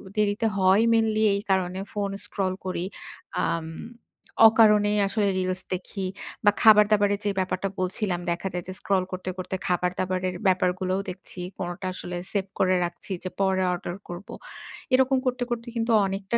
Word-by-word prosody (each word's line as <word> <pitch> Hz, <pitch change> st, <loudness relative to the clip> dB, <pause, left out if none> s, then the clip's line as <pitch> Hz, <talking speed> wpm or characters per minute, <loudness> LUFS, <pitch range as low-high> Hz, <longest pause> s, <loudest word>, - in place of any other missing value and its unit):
দেরিতে 210 Hz, +2 st, +1 dB
হয় 190 Hz, +2 st, +5 dB
মেইনলি 220 Hz, -1 st, +2 dB
এই 200 Hz, -, -1 dB
কারণে, 185 Hz, -1 st, +1 dB
ফোন 200 Hz, -1 st, -2 dB, 0.2 s
স্ক্রল 190 Hz, -2 st, -1 dB
করি। 185 Hz, -, -2 dB, 0.7 s
আম 165 Hz, -1 st, -1 dB, 0.8 s
অকারণেই 210 Hz, -2 st, +4 dB
আসলে 205 Hz, +1 st, 0 dB
রিলস 185 Hz, 0 st, -2 dB
দেখি 190 Hz, +1 st, -4 dB, 0.4 s
বা 205 Hz, -, +7 dB
খাবার 210 Hz, -1 st, +8 dB
দাবারের 205 Hz, -1 st, +3 dB
যে 205 Hz, -, +2 dB
ব্যাপারটা 185 Hz, +1 st, -1 dB
বলছিলাম, 185 Hz, 0 st, -1 dB
দেখা 170 Hz, +3 st, -2 dB
যায় 180 Hz, -1 st, -3 dB
যে 185 Hz, -, -5 dB
স্ক্রল 195 Hz, -3 st, +1 dB
করতে, 185 Hz, 0 st, -4 dB
করতে 185 Hz, +1 st, -4 dB
খাবার 180 Hz, 0 st, +1 dB
দাবারের 185 Hz, 0 st, -1 dB
ব্যাপারগুলোও 185 Hz, 0 st, +1 dB
দেখছি। 185 Hz, 0 st, -9 dB, 0.2 s
কোনটা 175 Hz, +1 st, -4 dB
আসলে 180 Hz, -1 st, -5 dB
সেভ 200 Hz, -2 st, 0 dB
করে 185 Hz, -1 st, +3 dB
রাখছি 175 Hz, +3 st, -7 dB
যে 185 Hz, -, -3 dB
পরে 190 Hz, -1 st, +2 dB
অর্ডার 175 Hz, 0 st, -5 dB
করবো। 175 Hz, +3 st, -8 dB, 0.6 s
এরকম 265 Hz, +1 st, +4 dB
করতে, 250 Hz, -1 st, 0 dB
করতে 235 Hz, 0 st, -3 dB
কিন্তু 230 Hz, 0 st, 0 dB
অনেকটা 195 Hz, +3 st, -1 dB
190 Hz, 160 wpm, -26 LUFS, 185-210 Hz, 0.8 s, খাবার